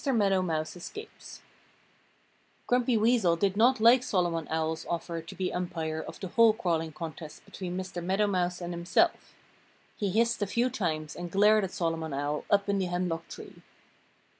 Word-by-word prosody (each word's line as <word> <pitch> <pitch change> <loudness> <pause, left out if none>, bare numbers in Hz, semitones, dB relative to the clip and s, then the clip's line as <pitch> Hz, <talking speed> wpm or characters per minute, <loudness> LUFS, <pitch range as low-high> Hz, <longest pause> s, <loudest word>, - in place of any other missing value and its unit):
MEADOW 205 -8 +2
MOUSE 160 -3 -2
ESCAPES 425 - -10 1.2
Grumpy 245 -1 +2
Weasel 215 -6 +3
did 195 +2 0
not 245 +4 +4
like 235 +3 +6
Solomon 175 -8 -1
Owl's 160 0 -1
offer 170 0 -3
to 165 - -11
be 185 -1 -2
umpire 160 -3 -3
of - - -9
the 190 - -5
hole 230 +2 +5
crawling 165 -6 -1
contest 155 0 -8
between 180 -1 -6
Mr. 185 -2 -5
Meadow 190 +4 +1
Mouse 180 -3 -1
and 175 0 -4
himself. 175 - 0 0.6
He 205 -3 -1
hissed 230 +3 +1
a 205 - +1
few 240 +5 +1
times 155 -7 -2
and 175 0 -6
glared 210 +3 +4
at 190 - -2
Solomon 165 -3 -2
Owl, 145 +2 -2
up 200 0 +3
in 200 -1 +1
the 190 - 0
hemlock 175 -2 -2
tree. - - -11
180 Hz, 165 wpm, -29 LUFS, 165-210 Hz, 1.2 s, like